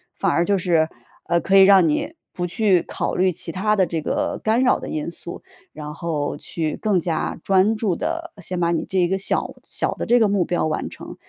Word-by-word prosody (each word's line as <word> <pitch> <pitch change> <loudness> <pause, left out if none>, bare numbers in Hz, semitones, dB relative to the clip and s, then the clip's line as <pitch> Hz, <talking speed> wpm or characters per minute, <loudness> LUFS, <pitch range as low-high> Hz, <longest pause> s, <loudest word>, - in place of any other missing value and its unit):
反 195 - 0
而 170 - +2
就 200 +2 +2
是， 170 -4 +2 0.4
呃， 170 0 +2
可 190 +4 +1
以 - - +9
让 190 -3 +6
你 155 - -1 0.2
不 175 - -3
去 190 -1 +2
考 - - -3
虑 185 0 +3
其 165 0 -6
他 210 +5 +1
的 190 -3 +3
这 165 -1 -3
个 - - -2
干 220 +3 +2
扰 250 - +3
的 - - -7
因 155 +2 -3
素， 170 0 -9 0.3
然 150 -1 -7
后 155 -3 -3
去 155 0 -3
更 205 -4 +1
加 165 -2 -2
专 195 +3 +3
注 210 -5 0
地 330 - -4
先 180 0 -3
把 170 -1 +1
你 170 - -1
这 190 - -2
一 175 - +3
个 190 +2 0
小 195 - -1
小 - - -1
的 - - -5
这 245 +1 +5
个 220 - +4
目 200 -2 +2
标 175 - 0
完 155 - -2
成。 - - -10
180 Hz, 245 characters per minute, -22 LUFS, 165-200 Hz, 0.4 s, 以